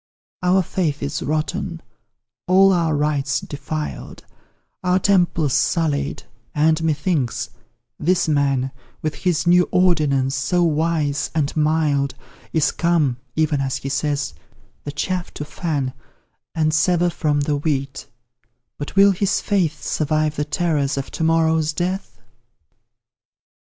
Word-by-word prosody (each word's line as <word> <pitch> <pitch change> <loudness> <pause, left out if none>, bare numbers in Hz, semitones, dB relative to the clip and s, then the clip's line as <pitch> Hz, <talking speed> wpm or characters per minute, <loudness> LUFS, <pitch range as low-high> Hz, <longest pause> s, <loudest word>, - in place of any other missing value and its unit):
Our 185 +1 +3
faith 155 -5 -2
is 140 +1 -3
rotten, 155 +3 -2 0.7
all 190 +1 +6
our 165 -3 +1
rites 145 -1 0
defiled, 150 +1 -6 0.6
Our 180 0 +3
temples 175 -7 +2
sullied, 150 -4 0 0.3
and, 155 +2 +3
methinks, 150 -5 -1 0.5
this 180 +2 +2
man, 140 -3 +1 0.3
With 155 -1 -1
his 175 -1 0
new 180 +1 +4
ordinance, 150 -7 +2
so 145 +7 +1
wise 155 -2 0
and 150 -3 0
mild, 150 -3 +1 0.4
Is 155 -2 +2
come, 165 -7 +1 0.2
even 155 -3 +1
as 135 -1 -1
He 135 - -5
says, 140 - -1 0.5
the 145 - -3
chaff 180 +5 -3
to 150 - -5
fan 145 -4 -2 0.6
And 155 -1 +1
sever 175 +2 +2
from 150 -2 0
the 145 0 0
wheat; 140 -2 -2 0.7
but 145 - -6
will 200 0 +7
his 195 +1 +1
faith 170 -7 0
Survive 155 0 0
the 150 - -1
terrors 150 -4 0
of 135 - -4
to - - -3
morrow's 160 -1 +2
death? 175 - -3
155 Hz, 125 wpm, -21 LUFS, 145-175 Hz, 0.7 s, will